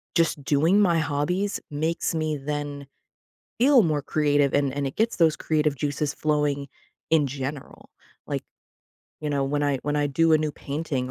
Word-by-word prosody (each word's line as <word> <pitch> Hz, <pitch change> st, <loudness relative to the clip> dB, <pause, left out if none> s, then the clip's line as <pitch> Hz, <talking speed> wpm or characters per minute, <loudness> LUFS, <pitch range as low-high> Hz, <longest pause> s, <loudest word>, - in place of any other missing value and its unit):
just 165 Hz, -3 st, +1 dB
doing 155 Hz, +8 st, +3 dB
my 175 Hz, -4 st, +3 dB
hobbies 160 Hz, +6 st, -1 dB
makes 160 Hz, +3 st, -1 dB
me 155 Hz, -1 st, -1 dB
then 145 Hz, 0 st, -5 dB, 0.7 s
feel 260 Hz, 0 st, +6 dB
more 155 Hz, -5 st, +1 dB
creative, 145 Hz, -1 st, +1 dB
and 140 Hz, -2 st, +2 dB
and 140 Hz, 0 st, -2 dB
it 135 Hz, -, -5 dB
gets 225 Hz, +2 st, +1 dB
those 165 Hz, -3 st, +3 dB
creative 150 Hz, -2 st, 0 dB
juices 145 Hz, +1 st, -2 dB
flowing 150 Hz, -2 st, 0 dB, 0.4 s
in 160 Hz, -3 st, +4 dB
general. 135 Hz, +1 st, -6 dB, 0.4 s
Like, -, -, -3 dB, 0.8 s
you 150 Hz, -, -3 dB
know, 140 Hz, -1 st, 0 dB
when 145 Hz, +2 st, -1 dB
I 140 Hz, -2 st, +1 dB
when 145 Hz, 0 st, -1 dB
I 145 Hz, 0 st, +2 dB
do 165 Hz, +3 st, +2 dB
a 155 Hz, -, +6 dB
new 155 Hz, -1 st, -2 dB
painting 140 Hz, -3 st, -3 dB
150 Hz, 170 wpm, -25 LUFS, 140-160 Hz, 0.8 s, feel